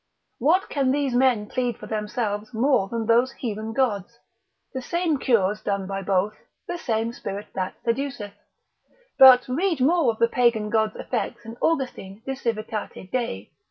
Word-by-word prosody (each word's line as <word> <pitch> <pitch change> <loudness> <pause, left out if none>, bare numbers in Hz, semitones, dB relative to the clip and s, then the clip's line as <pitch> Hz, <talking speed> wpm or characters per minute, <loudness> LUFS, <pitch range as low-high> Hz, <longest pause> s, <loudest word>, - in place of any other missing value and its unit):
What 335 +10 +3
can 275 -3 0
these 275 -1 +1
men 245 -4 +3
plead 245 +1 -2
for - - -10
themselves 215 0 -3
more 245 -3 +2
than 230 +2 -3
those 240 +3 +3
heathen 220 -2 -4
gods, 230 -3 -1 0.6
the 260 - -3
same 335 +1 0
cures 210 -6 +2
done 200 -1 -2
by 195 +1 -4
both, 195 +2 0 0.3
the 350 0 -4
same 225 -3 -1
spirit 200 -3 -6
that 185 -1 -3
seduceth; 235 -4 -2 0.9
but 255 -2 +9
read 325 +5 0
more 305 +1 +3
of 220 - -9
the 230 - +4
Pagan 230 -3 +1
god's 220 -1 +1
effects 235 -1 -4
in 225 +1 -8
Austin 245 -10 -2
de 270 - -3
Civitate 215 -6 -4
Dei, 170 - -2
l. - - -45
230 Hz, 160 wpm, -24 LUFS, 210-260 Hz, 0.9 s, but